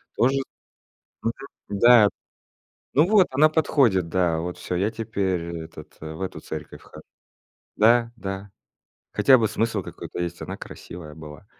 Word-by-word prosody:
Тоже 130 +3 +3 0.9
Мгм, 115 - 0 0.5
да. 120 -3 +7 0.9
Ну, 150 +5 +5
вот, 205 -4 +5
она 150 +4 +5
подходит, 130 - +2
да, 85 -2 +1
вот 90 +1 -4
всё, 90 - -4
я 100 +4 +1
теперь 100 -6 -2 0.2
этот, 80 - -12
в 80 +3 -8
эту 95 - -4
церковь - - -8
хожу. - - -13 0.7
Да, 115 +2 +4
да, 95 0 -6 0.6
хотя 130 -2 +5
бы 110 -2 +2
смысл 110 -4 -1
какой-то - - -8
есть, 85 -2 -4
она - - -5
красивая 80 -3 -10
была. 75 +2 -11
100 Hz, 140 wpm, -24 LUFS, 90-120 Hz, 0.9 s, да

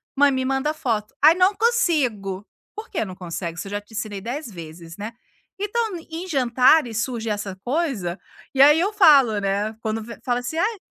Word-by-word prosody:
"Mãe 285 0 +5
me 260 -1 -1
manda 270 +3 0
foto". 225 -8 -2
"Ai 310 +2 +9
não 370 +2 +4
consigo". 275 - 0 0.3
Por 430 +1 -8
que 345 - -1
não 185 -2 -8
consegue? 170 -2 -5
Isso 175 - -5
eu - - -8
já 205 0 -3
te 210 +2 -20
ensinei 210 -3 -4
10 245 +6 -5
vezes, 165 -2 -10
né, 210 +2 -5 0.5
então 420 -1 -1
em 330 +3 -5
jantares 255 - +3
surge 230 -3 -4
essa 205 -2 -3
coisa, 245 - -2 0.4
e 265 - +4
aí 295 +3 +7
eu 385 +5 +1
falo 285 - +6
né, 200 +2 -1
quando 220 0 -3 0.2
fala 245 -1 0
assim: 245 +6 -5
"Ai, 420 +6 0
245 Hz, 185 wpm, -23 LUFS, 205-315 Hz, 0.5 s, Ai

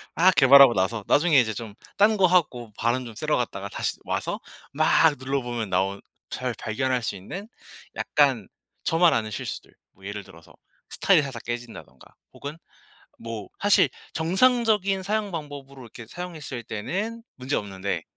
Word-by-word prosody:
막 185 +3 +5
개발하고 135 -2 +8
나서 100 +3 -1
나중에 150 -2 +4
이제 110 -3 +1
좀 110 -3 -7 0.2
딴 210 +1 +4
거 190 - +5
하고 130 - +1
바람 120 +2 0
좀 115 -2 -10
쐬러 - - 0
갔다가 - - -3
다시 - - -2
와서 - - -3 0.3
막 155 0 +4
눌러보면 120 -5 -3
나온 95 +2 0 0.3
잘 125 -1 -3
발견할 125 +2 -1
수 100 - -2
있는 185 - -8 0.5
약간 - - +1 0.3
저만 165 -2 +4
아는 110 -3 -1
실수들. - - -6 0.2
뭐 95 +1 -18
예를 100 -1 -6
들어서 85 -4 -17 0.4
스타일이 - - +3
살짝 130 -4 -7
깨진다든가 120 0 -8 0.2
혹은 145 +3 -8 0.6
뭐 115 -3 -7
사실 205 -1 +5 0.2
정상적인 200 +2 +2
사용 210 +1 -1
방법으로 140 -4 -8
이렇게 115 0 -11
사용했을 155 -6 -7
때는 205 - -4
문제 130 +2 -2
없는데 95 -4 -3
130 Hz, 325 characters per minute, -25 LUFS, 110-175 Hz, 0.6 s, 개발하고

